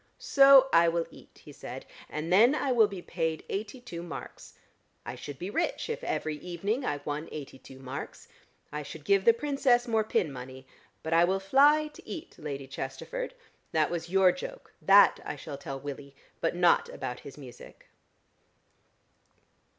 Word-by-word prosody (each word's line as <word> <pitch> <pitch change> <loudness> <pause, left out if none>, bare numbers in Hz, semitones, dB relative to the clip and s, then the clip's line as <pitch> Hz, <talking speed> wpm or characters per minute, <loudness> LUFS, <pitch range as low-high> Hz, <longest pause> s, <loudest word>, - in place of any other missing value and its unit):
"So 275 -1 +7
I 170 0 +6
will 165 0 0
eat," - - -17
he - - -11
said, - - -9 0.2
"and 160 +3 -3
then 235 +9 +6
I 280 -3 0
will 230 -4 +5
be 195 -3 -8
paid 160 -2 -2
eighty 210 +5 -4
two 175 -9 -8
marks. 170 -1 -9 0.5
I 120 - -5
should 135 +3 -8
be 180 +7 -5
rich 405 - -1
if - - -5
every 155 -1 -2
evening 195 - -3
I 145 - -2
won 150 +2 -4
eighty 140 -3 -8
two 130 - -13
marks. 135 +1 -8 0.4
I 150 - -4
should 150 +1 -10
give 195 -1 +3
the 230 - +9
Princess 260 -2 +1
more 225 -2 +2
pin 210 -7 0
money. 130 0 -9 0.4
But 160 - -2
I 165 +1 +6
will 190 +2 +1
fly 285 +10 +4
to 300 - -16
eat, 345 0 -8
Lady 140 -2 -5
Chesterford. 135 - -6 0.4
That 155 0 +2
was 170 -1 -4
your 190 0 +5
joke: 180 - -9
that 200 +1 +6
I - - -5
shall 145 0 -8
tell 135 0 -6
Willie, 140 0 -8 0.2
but 165 - -1
not 175 -1 +3
about 125 0 -6
his 140 - -11
music." 130 -4 -13
170 Hz, 175 wpm, -29 LUFS, 145-230 Hz, 0.5 s, the